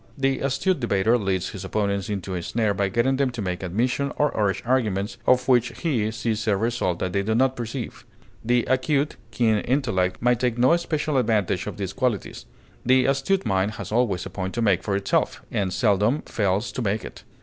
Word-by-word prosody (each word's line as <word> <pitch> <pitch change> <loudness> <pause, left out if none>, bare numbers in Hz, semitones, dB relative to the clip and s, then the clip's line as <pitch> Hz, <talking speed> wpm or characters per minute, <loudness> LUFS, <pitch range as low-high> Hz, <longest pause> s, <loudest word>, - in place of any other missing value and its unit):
The 135 -1 +1
astute 140 +7 0
debater 110 -1 +2
leads 95 -5 -1
his 95 - -7
opponents 100 0 -1
into 95 -2 -3
a 90 - -2
snare 110 +3 0
by 100 0 0
getting 120 +6 +1
them 140 -1 +2
to 120 - -8
make 90 -1 -3
admissions, 125 +9 -1
or 150 -1 +2
urge 100 -3 0
arguments, 110 -5 0
of 125 0 +4
which 120 -2 +2
he 120 -10 0
sees 110 0 -2
a 100 -2 +3
result 115 -5 0
that 90 0 -3
they 100 - +1
do 110 +3 0
not 130 +2 +2
perceive. 120 0 -5 0.4
The 120 +1 +2
acute, 140 +3 +1
keen 110 -3 +2
intellect 115 -9 0
may 125 +1 +3
take 120 -1 -1
no 130 +7 +5
special 155 -3 -1
advantage 105 -7 +1
of - - -5
these 95 -2 -4
qualities; 120 - -2 0.4
the 130 +1 +4
astute 140 +9 +1
mind 95 +2 +1
has - - -7
always 110 -6 +1
a - - -7
point 95 +1 -4
to 120 - -1
make 100 -6 +3
for 100 - -1
itself, 100 0 0
and 95 -2 -1
seldom 105 +6 +2
fails 100 +1 -1
to - - -4
make 105 -1 -1
it. - - -10
115 Hz, 200 wpm, -24 LUFS, 100-130 Hz, 0.4 s, no